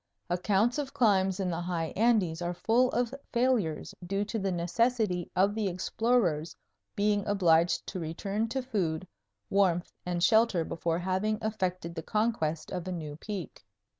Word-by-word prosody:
Accounts 205 +8 +2
of 275 -2 -4
climbs 195 -4 +3
in 185 -2 0
the 165 +1 -2
high 170 -2 -2
Andes 205 -7 +2
are 175 0 -2
full 235 +8 +3
of 245 0 -1 0.2
failures 235 -10 +1
due 195 +3 -1
to 220 +2 -3
the 195 -1 -1
necessity 185 +1 0
of 195 +2 +3
the 215 -2 -1
explorers' 185 -3 0 0.4
being 205 0 +2
obliged 175 -4 +3
to 185 - -5
return 195 +7 -2
to 260 +2 -2
food, 185 -9 -2 0.4
warmth, 185 -3 +2
and 175 -1 -2
shelter 220 -5 +4
before 165 0 -1
having 190 +4 0
effected 185 -5 -2
the 165 - -5
conquest 165 -6 -1
of 180 -1 -4
a - - -2
new 155 -4 -5
peak. 185 - -7
190 Hz, 155 wpm, -29 LUFS, 175-220 Hz, 0.4 s, shelter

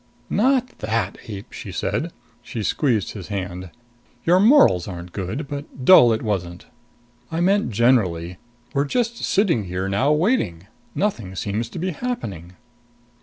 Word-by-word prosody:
"Not 255 +2 +2
that, 110 +2 -1
ape!" 100 -3 -8
she - - -7
said. - - -2 0.3
She 110 - -5
squeezed 115 - 0
his 95 -6 -8
hand. 95 -2 -5 0.6
"Your 180 +2 +5
morals 215 - +5
aren't 90 -2 -7
good, 100 - -4
but 140 -2 -7
dull 125 -11 +8
it 110 - -1
wasn't. 90 -5 -3 0.7
I 160 - -2
meant 195 +1 +2
generally. 95 -7 +1 0.3
We're 140 +1 +1
just 235 - -1
sitting 185 - +1
here 90 +1 -3
now 100 +9 +2
waiting. 150 - +1 0.3
Nothing 115 - -2
seems 105 +5 -2
to - - -9
be 185 +2 -1
happening." 105 - -5
115 Hz, 140 wpm, -22 LUFS, -, 0.7 s, dull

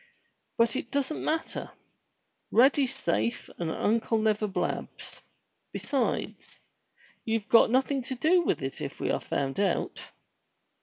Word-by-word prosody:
But 230 +1 +3
it 250 - -3
doesn't 280 +3 -1
matter. 320 +1 -2 0.8
Rady's 265 +2 +4
safe 110 +4 -1
and 170 -2 -1
Uncle 225 +6 +1
never 215 -1 +1
blabs. 190 -2 -4 0.5
Besides, 270 -3 -2 0.7
you've 225 -1 -1
got 230 - +7
nothing 265 +3 +2
to 260 - -4
do 330 +7 +4
with 335 - -1
it 135 - -4
if - - -5
we - - 0
are - - -1
found 135 +2 -2
out." 200 - -1
230 Hz, 130 wpm, -28 LUFS, 205-270 Hz, 0.8 s, got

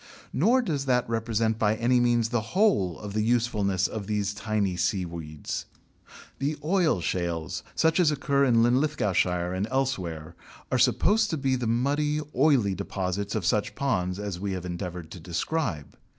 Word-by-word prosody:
Nor 240 - +3
does 145 -10 -2
that 125 -2 +2
represent 115 -1 0
by 105 -1 +2
any 120 +2 +2
means 120 -2 +2
the 120 -1 0 0.2
whole 100 - +3
of 105 -2 -7
the 110 - +1
usefulness 105 -5 +1
of 105 -3 -4
these 105 -1 -1
tiny 105 -4 -1
seaweeds. 85 -5 -3 0.7
The 145 +3 -1
oil 165 - +2
shales, 85 -2 -2
such 160 +2 +2
as 175 -4 +5
occur 140 -1 +1
in 115 -3 +4
Linlithgowshire 105 - +1
and 95 +3 -1
elsewhere, 95 -13 -2 0.4
are - - +2
supposed 215 +2 +3
to 160 - -1
be 135 -2 +1
the 125 -2 -2
muddy, 145 +6 +1 0.2
oily 130 -8 +3
deposits 100 +1 -3
of 105 -5 -2
such 105 +2 +1
ponds 90 -10 -1
as 100 -4 -4
we 100 0 -2
have 90 -1 -5
endeavoured 90 -2 -5
to 90 - -8
describe. 85 - -3
110 Hz, 160 wpm, -27 LUFS, 90-135 Hz, 0.7 s, as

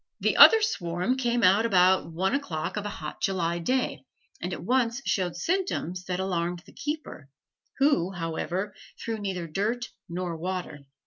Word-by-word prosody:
The - - +1
other 445 -1 +9
swarm 180 - 0
came 240 -3 0
out 195 +4 +5
about 185 -5 +3
one 185 +4 0
o'clock 175 - -2
of 210 -1 -3
a - - -3
hot 155 -6 -7
July 175 -3 0
day, 255 +9 -1 0.4
and - - -3
at - - -5
once 245 -1 +1
showed 180 -3 0
symptoms 185 - -2
that 180 0 -2
alarmed 175 -2 -2
the - - -17
keeper, 295 - -5 0.5
who, 270 - +3
however, 175 +4 -3 0.3
threw 225 -1 -4
neither 190 -4 -3
dirt 215 +9 -2 0.2
nor 175 0 -3
water. 175 -5 -5
185 Hz, 155 wpm, -27 LUFS, 175-235 Hz, 0.5 s, other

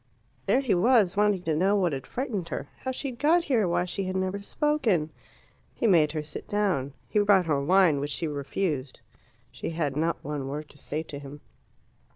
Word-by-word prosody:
There 265 - +4
he 260 - +1
was, 200 0 +4
wanting 205 -3 +2
to 160 -2 0
know 190 +6 +3
what 180 -6 +1
had 135 -1 -5
frightened 220 -9 -3
her, - - -4
how 260 - -4
she 270 +2 -4
had 235 - -13
got 330 +4 +4
here, 240 - +2
why 175 +1 +1
she 190 +2 -3
had 185 0 -3
never 190 +1 -1
spoken. 215 - 0 0.6
He - - -2
made 165 -8 +5
her 155 -1 -2
sit 150 0 -8
down. 185 -10 0
He 210 - +1
brought 200 -3 +4
her 145 -4 +1
wine, 175 -2 +4
which 145 +1 -3
she 160 - -2
refused. 145 -1 -3 0.5
She 125 - -5
had 155 -4 -2
not 165 +3 -1
one 145 -2 -4
word 150 +2 -5
to - - -17
say 155 +2 -3
to 145 -3 -8
him. 140 +1 -10
175 Hz, 200 wpm, -27 LUFS, 150-205 Hz, 0.6 s, made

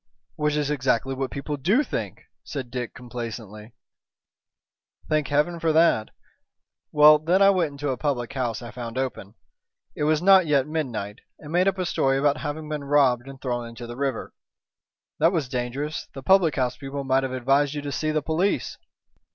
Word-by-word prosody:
"Which 150 -1 0
is 150 -1 0
exactly 135 -2 0
what 135 0 -3
people 145 +1 -4
do 195 - +2
think," - - -5 0.2
said 130 -5 -6
Dick, 125 -2 -5
complacently. 115 -3 -8 1.3
"Thank 155 -2 +1
Heaven 150 +4 +1
for 165 -1 +1
that. 160 -9 +3 0.8
Well, 150 0 +7
then 170 +5 +2
I 200 0 +7
went 170 -6 0
into 145 0 -4
a 130 - -3
public 130 -6 -2
house 125 -3 -2
I 120 - -8
found 120 0 -7
open 125 -5 -4 0.6
it 150 - -1
was 155 0 +3
not 190 0 +6
yet 140 -3 +3
midnight 125 -10 -4 0.2
and 150 - -11
made 180 +3 +3
up 195 -1 +1
a 185 - -1
story 135 -5 +1
about 145 +1 +2
having 150 +1 -5
been 150 -1 -4
robbed 135 -3 +3
and 135 -1 -10
thrown 120 -2 -3
into 115 +1 -9
the 120 0 -8
river." 135 -2 -3 0.9
"That 165 +3 +4
was 160 -8 -1
dangerous. 130 +4 -4
The 135 - -8
public 185 -2 +4
house 125 -1 -1
people 140 0 -5
might 135 0 +2
have 135 -1 -3
advised 135 +3 +1
you 145 - -4
to 145 - -4
see 155 +2 -1
the 155 -1 0
police." 165 +7 -1
140 Hz, 185 wpm, -24 LUFS, 125-155 Hz, 1.3 s, Well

